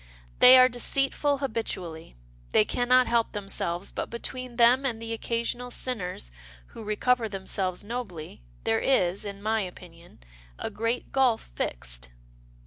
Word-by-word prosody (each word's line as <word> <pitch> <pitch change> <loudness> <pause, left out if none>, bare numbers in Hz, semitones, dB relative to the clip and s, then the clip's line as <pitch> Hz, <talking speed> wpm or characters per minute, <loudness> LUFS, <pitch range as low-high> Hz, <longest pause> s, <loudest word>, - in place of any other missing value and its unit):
They 255 +1 +10
are 255 0 +8
de 245 -1 -6
ceitful 275 +2 +1
habitually. 180 - -4 0.4
They 105 - +5
can 245 0 -2
not 255 0 +6
help 235 -1 +1
themselves, 195 -3 -3
but - - -4
between 250 +1 -6
them 240 +3 +5
and 240 -5 -1
the 230 0 -4
occasional 235 +2 -2
sinners 185 - -3 0.4
who - - -10
recover 225 +2 +1
themselves 190 -2 -3
nobly 205 - -6 0.2
there 110 - +1
is, 195 -7 +1
in 200 0 -7
my 220 0 +1
opinion, 175 -2 -10 0.4
a - - -4
great 230 +3 -2
gulf 255 - +1
fixed." - - -3
225 Hz, 140 wpm, -27 LUFS, 180-250 Hz, 0.4 s, They